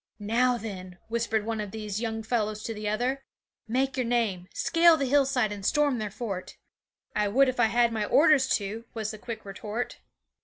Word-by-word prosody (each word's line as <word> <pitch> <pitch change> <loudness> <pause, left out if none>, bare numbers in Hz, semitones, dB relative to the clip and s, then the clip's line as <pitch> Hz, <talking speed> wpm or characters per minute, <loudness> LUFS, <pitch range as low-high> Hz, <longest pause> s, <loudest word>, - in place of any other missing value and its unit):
"Now 240 +4 +2
then," 185 -5 -7
whispered 225 -2 0
one 225 -1 -2
of 205 - -5
these 210 0 -4
young 225 -1 -3
fellows 215 -2 -1
to 225 - -3
the 210 -1 -3
other, 250 +6 -1 0.4
"make 260 +3 0
your 255 - 0
name; 215 -7 0
scale 335 -1 +4
the 280 - 0
hillside 265 -4 +2
and 205 -1 -6
storm 285 +2 +2
their 215 -1 -3
fort." 200 -3 -6 0.6
'"I 210 0 +2
would 265 +7 +4
if 255 -1 -2
I - - +6
had 235 0 +2
my 215 -2 -1
orders 290 +1 +5
to," 215 +3 -4
was 220 -1 -2
the 215 - -9
quick 225 -1 -7
retort. 210 +4 -5
225 Hz, 190 wpm, -27 LUFS, 210-250 Hz, 0.6 s, I